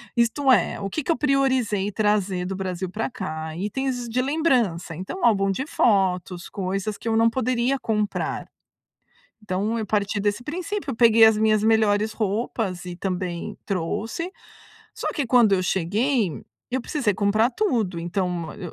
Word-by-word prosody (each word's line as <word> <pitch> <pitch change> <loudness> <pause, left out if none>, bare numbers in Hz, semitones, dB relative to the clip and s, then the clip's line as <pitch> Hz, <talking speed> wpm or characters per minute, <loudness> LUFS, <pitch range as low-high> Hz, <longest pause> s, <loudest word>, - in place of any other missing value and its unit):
Isto 240 +4 +2
é, 210 -9 +3
o 195 - -3
que 310 - -3
que 330 - 0
eu 330 - +1
priorizei 260 -8 +1
trazer 200 -3 0
do 190 +1 -3
Brasil 185 -1 -3
pra 220 +7 -3
cá: 160 -10 -5
itens 245 +5 -2
de 240 +2 0
lembrança, 255 - +1
então 190 - -4
álbum 195 -4 +3
de 260 +8 -2
fotos, 185 - +1
coisas 195 +2 -3
que 230 - -4
eu 225 - +2
não 230 0 +5
poderia 255 +2 0
comprar. 210 -3 -2 1.0
Então 205 +3 -1
eu 220 - -2
parti 205 0 0
desse 205 +4 -1
princípio, 355 -1 -4
peguei 230 -1 +7
as 220 -1 +6
minhas 215 -1 +3
melhores 220 -1 +3
roupas 210 -3 -2
e 180 -1 -6
também 180 -2 -4
trouxe. 215 - -2 0.6
Só - - -3
que 285 -5 -1
quando 235 -4 +5
eu 185 - +1
cheguei, 195 - 0 0.3
eu 260 +1 0
precisei 245 -6 0
comprar 215 +4 +2
tudo. 230 - 0
Então, 175 -1 -2
eu 180 -5 -8
215 Hz, 155 wpm, -24 LUFS, 190-245 Hz, 1.0 s, peguei